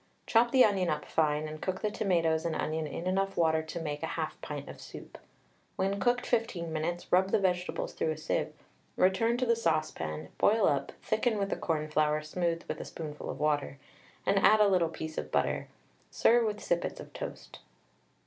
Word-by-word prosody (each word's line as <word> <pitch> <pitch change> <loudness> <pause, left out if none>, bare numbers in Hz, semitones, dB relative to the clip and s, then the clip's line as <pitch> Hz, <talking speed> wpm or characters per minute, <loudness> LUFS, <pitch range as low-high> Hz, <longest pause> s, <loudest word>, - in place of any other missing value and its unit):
Chop 235 +1 +4
the 260 0 +6
onion 195 -4 +1
up 150 -1 -2
fine, 155 -1 +1
and 155 0 -8
cook 185 0 -2
the 210 - +1
tomatoes 165 -6 +1
and 165 -2 -1
onion 155 0 -2
in 165 +4 -6
enough 195 +1 0
water 160 -1 +3
to 160 +2 -6
make 150 -2 -4
1/2 160 -1 -2
pint 145 -2 -6
of - - -10
soup. - - -10 0.6
When 195 +1 0
cooked 245 +4 +1
15 180 -9 -1
minutes 165 +3 -3
rub 185 +1 +4
the - - +3
vegetables 180 -3 -1
through - - -1
a 155 - -2
sieve; 155 - -1 0.4
return 225 +6 +3
to 255 - 0
the 235 -1 +3
saucepan, 155 - -1
boil 220 0 +4
up, 140 -1 0
thicken 220 0 +1
with 200 -1 -1
the - - +1
cornflour 155 -1 0
smoothed 170 +1 -1
with - - -4
a - - -6
spoonful 150 -2 -7
of 130 - -5
water, 150 -2 0 0.5
and 200 - +3
add 215 +2 +6
a 210 - +6
little 180 -4 +3
piece 160 -1 -5
of - - -6
butter; - - 0 0.4
serve 235 0 +4
with 210 -1 -4
sippets 175 0 -1
of - - -10
toast. - - -7
170 Hz, 190 wpm, -30 LUFS, 155-200 Hz, 0.6 s, the